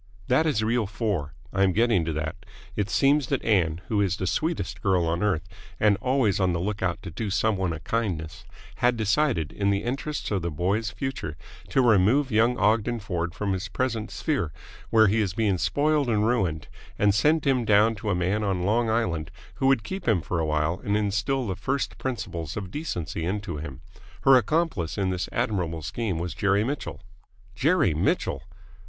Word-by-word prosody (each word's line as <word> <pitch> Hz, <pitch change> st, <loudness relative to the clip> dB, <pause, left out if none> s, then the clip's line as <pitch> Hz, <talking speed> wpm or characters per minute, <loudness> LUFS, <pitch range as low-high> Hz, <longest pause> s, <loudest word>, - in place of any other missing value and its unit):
"That 155 Hz, +6 st, +3 dB
is 125 Hz, -8 st, +1 dB
reel 115 Hz, -1 st, +1 dB
four. 100 Hz, -, -2 dB, 0.2 s
I 95 Hz, -, 0 dB
am 95 Hz, -1 st, +4 dB
getting 115 Hz, -4 st, +3 dB
to 80 Hz, -, -2 dB
that. 80 Hz, +1 st, -3 dB, 0.4 s
It 105 Hz, -1 st, -1 dB
seems 140 Hz, +1 st, +3 dB
that -, -, -1 dB
Ann, 85 Hz, -6 st, +2 dB
who 105 Hz, -2 st, +1 dB
is 95 Hz, -1 st, +1 dB
the 95 Hz, -, -2 dB
sweetest 155 Hz, -, -2 dB
girl 95 Hz, -4 st, +2 dB
on 85 Hz, +1 st, -1 dB
earth 100 Hz, -4 st, 0 dB, 0.3 s
and 105 Hz, -1 st, +4 dB
always 125 Hz, -6 st, +1 dB
on 95 Hz, -2 st, +2 dB
the 85 Hz, -, -1 dB
lookout 95 Hz, -1 st, -2 dB
to 85 Hz, -, -6 dB
do 105 Hz, +6 st, -3 dB
some 110 Hz, +2 st, +1 dB
one 95 Hz, -2 st, -1 dB
a 80 Hz, -, -4 dB
kindness, 85 Hz, -5 st, -3 dB, 0.3 s
had 120 Hz, 0 st, +2 dB
decided, 110 Hz, -, +1 dB
in 100 Hz, -1 st, 0 dB
the 100 Hz, 0 st, +1 dB
interests 135 Hz, +3 st, -3 dB
of 100 Hz, -3 st, 0 dB
the 85 Hz, -, -2 dB
boy's 95 Hz, +7 st, 0 dB
future, 130 Hz, -, -5 dB, 0.3 s
to 135 Hz, -3 st, +3 dB
remove 120 Hz, +5 st, +4 dB
young 115 Hz, +3 st, +3 dB
Ogden 115 Hz, +2 st, +2 dB
Ford 85 Hz, -4 st, -3 dB
from 100 Hz, -2 st, -1 dB
his 95 Hz, +2 st, -3 dB
present 115 Hz, 0 st, -2 dB
sphere, 135 Hz, -, -1 dB, 0.4 s
where 110 Hz, -1 st, +6 dB
he 110 Hz, +2 st, +3 dB
is 95 Hz, -4 st, -2 dB
being 100 Hz, -5 st, +1 dB
spoiled 145 Hz, -, +1 dB
and 105 Hz, -2 st, +2 dB
ruined, 90 Hz, -, 0 dB, 0.3 s
and 100 Hz, -1 st, +3 dB
send 150 Hz, +10 st, +2 dB
him 130 Hz, -3 st, +2 dB
down 110 Hz, +1 st, +4 dB
to 105 Hz, 0 st, -5 dB
a 100 Hz, -, +2 dB
man 95 Hz, +4 st, 0 dB
on 95 Hz, -3 st, 0 dB
Long 115 Hz, +4 st, +2 dB
Island 85 Hz, -9 st, 0 dB, 0.3 s
who 135 Hz, -, +1 dB
would 135 Hz, -5 st, +3 dB
keep 190 Hz, -, -6 dB
him 95 Hz, -8 st, +3 dB
for 85 Hz, -, -2 dB
awhile 75 Hz, +3 st, 0 dB
and 105 Hz, +1 st, +1 dB
instil 105 Hz, +6 st, 0 dB
the 95 Hz, -4 st, -2 dB
first 135 Hz, +7 st, -2 dB
principles 90 Hz, -, -4 dB
of 95 Hz, -3 st, -5 dB
decency 90 Hz, -, -4 dB
into 95 Hz, -2 st, -3 dB
him. 70 Hz, -4 st, -7 dB, 0.4 s
Her 135 Hz, -, +7 dB
accomplice 130 Hz, -, +1 dB
in 95 Hz, -2 st, 0 dB
this 90 Hz, 0 st, -3 dB
admirable 85 Hz, -6 st, -1 dB
scheme 95 Hz, +1 st, -2 dB
was 85 Hz, +1 st, -3 dB
Jerry 100 Hz, 0 st, +2 dB
Mitchell." 135 Hz, -6 st, -4 dB, 0.5 s
"Jerry 140 Hz, -, +2 dB
Mitchell!" 75 Hz, -, 0 dB
105 Hz, 190 wpm, -26 LUFS, 90-120 Hz, 0.5 s, Her